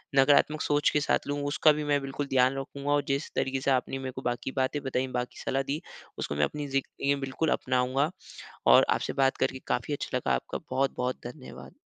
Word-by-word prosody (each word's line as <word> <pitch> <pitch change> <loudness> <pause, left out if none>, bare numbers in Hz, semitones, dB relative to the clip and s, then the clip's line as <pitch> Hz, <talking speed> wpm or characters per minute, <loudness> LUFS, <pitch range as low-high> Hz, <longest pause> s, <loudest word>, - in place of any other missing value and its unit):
नकारात्मक 145 +3 +4
सोच 145 0 +2
के 150 - +1
साथ 145 - 0
लूँ। 145 0 -1
उसका 155 +1 +5
भी 150 0 -1
मैं 145 - +4
बिल्कुल 135 +1 -4
ध्यान 130 0 +3
रखूँगा 140 +1 -4
और 145 0 +3
जिस 140 +2 -1
तरीके 135 0 0
से 135 - +1
आपने 130 +1 0
मेरे 130 -1 -4
को 130 - -7
बाकी 120 +1 -2
बातें 140 +2 -1
बताई, 130 0 -1
बाकी 125 -1 -4
सलाह 135 +1 0
दी 145 +5 -3 0.4
उसको 70 - -3
मैं 75 - +2
अपनी 150 -1 -5
ज़िंदगी 135 +1 0
बिल्कुल 135 +4 -1
अपनाऊँगा। 130 +3 +1 0.6
और - - +7
आपसे - - 0
बात 135 - +2
करके 130 0 0
काफ़ी 125 +4 -1
अच्छा - - -2
लगा - - 0
आपका - - -4
बहुत-बहुत 130 -2 -1
धन्यवाद। 130 +2 -11
135 Hz, 200 wpm, -28 LUFS, 130-145 Hz, 0.6 s, और